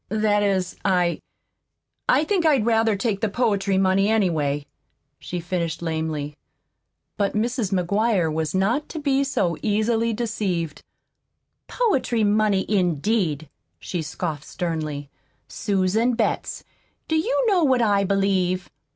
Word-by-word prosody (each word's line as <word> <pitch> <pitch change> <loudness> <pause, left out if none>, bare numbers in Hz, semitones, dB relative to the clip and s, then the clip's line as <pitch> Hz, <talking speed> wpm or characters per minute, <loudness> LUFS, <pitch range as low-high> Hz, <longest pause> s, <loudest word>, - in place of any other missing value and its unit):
"That 210 0 +2
is, 190 -3 0
I 180 -3 +1 0.9
I 295 - +4
think 365 +1 +1
I'd 280 -9 +3
rather 225 -2 +3
take 200 -1 -1
the 220 - +1
poetry 200 -4 +1
money, 190 +1 +3
anyway," 155 -9 +1 0.5
she 175 - -5
finished 170 -1 -3
lamely. 160 -3 -3 0.8
But 200 -1 0
Mrs. 235 -1 -1
McGuire 190 -2 +1
was 160 +1 -2
not 220 +10 +1
to 320 - -5
be 280 -2 +1
so 190 -11 0
easily 225 +2 +1
deceived. 200 -8 -2 0.9
"Poetry 265 - +1
money, 205 -2 +2
indeed!" 175 -4 0 0.3
she 175 - -4
scoffed 150 -1 -4
sternly. 155 -5 -4 0.4
"Susan 205 +5 0
Betts, - - -1 0.4
do 320 - 0
you 475 +10 +1
know 380 -5 +3
what 260 -4 +3
I 200 -2 +3
believe? 190 -2 0
200 Hz, 125 wpm, -23 LUFS, 175-225 Hz, 0.9 s, I